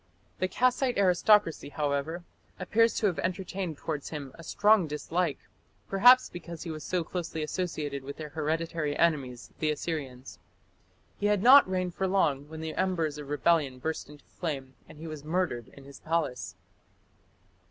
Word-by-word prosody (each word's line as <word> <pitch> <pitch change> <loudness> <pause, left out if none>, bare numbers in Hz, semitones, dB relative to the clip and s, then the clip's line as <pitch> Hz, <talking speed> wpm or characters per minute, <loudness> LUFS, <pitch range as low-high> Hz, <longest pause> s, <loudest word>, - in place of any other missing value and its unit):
The 185 - +1
Kassite 250 +5 +1
aristocracy, 185 -4 +3
however, 150 +3 -2 0.4
appear 220 +5 +3
to 225 - -2
have 180 -7 +1
entertained 185 0 -3
towards 150 -2 -4
him 145 -4 -6
a - - -12
strong 205 +1 +3
dislike, 160 +4 -1 0.5
perhaps 245 +6 +7
because 170 -2 -8
he 170 - -5
was 155 -1 -7
so 180 -2 -1
closely 165 -2 -4
associated 150 -4 -3
with 140 +1 -7
their 155 -1 -6
hereditary 160 0 -2
enemies 135 -7 0
the 155 - +1
Assyrians. 140 - -4 0.8
He 205 - +1
had 205 -1 +2
not 265 -3 +8
reigned 185 -1 -1
for 190 - -1
long 150 -7 +1
when 160 0 -8
the 160 0 -4
embers 165 -6 -1
of 145 -1 -8
rebellion 145 -2 +2
burst 160 +3 -4
into 150 -1 -15
flame 135 -6 -5 0.2
and - - -13
he 160 - -9
was 155 -3 -7
murdered 155 -8 -1
in 140 - -15
his 140 0 -13
palace. 155 -7 -2
160 Hz, 160 wpm, -29 LUFS, 145-185 Hz, 0.8 s, not